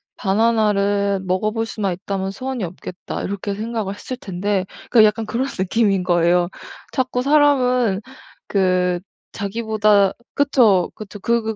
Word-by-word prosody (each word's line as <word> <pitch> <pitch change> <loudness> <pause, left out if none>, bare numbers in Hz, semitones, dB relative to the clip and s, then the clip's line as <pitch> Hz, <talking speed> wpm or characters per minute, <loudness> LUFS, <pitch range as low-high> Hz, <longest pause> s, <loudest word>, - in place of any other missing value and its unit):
'바나나를 200 -2 +1
먹어 185 +3 0
볼 225 +1 -2
수만 205 -4 -2
있다면 190 +1 -4
소원이 255 +3 -4
없겠다.' 180 +1 -6
이렇게 200 0 -3
생각을 215 -2 -3
했을 255 - -6
텐데 195 -3 -2 0.3
그러니까 225 -3 +7
약간 220 +1 -1
그런 245 +5 -1
느낌인 195 0 +1
거예요. 175 0 +2 0.4
자꾸 255 -1 -1
사람은 255 -7 +3 0.5
그 185 -2 +2 0.3
자기보다 210 -1 +2 0.2
그쵸, 235 -10 +3
그쵸 210 -1 -9
그 235 +4 +1
205 Hz, 295 characters per minute, -20 LUFS, 190-230 Hz, 0.5 s, 그러니까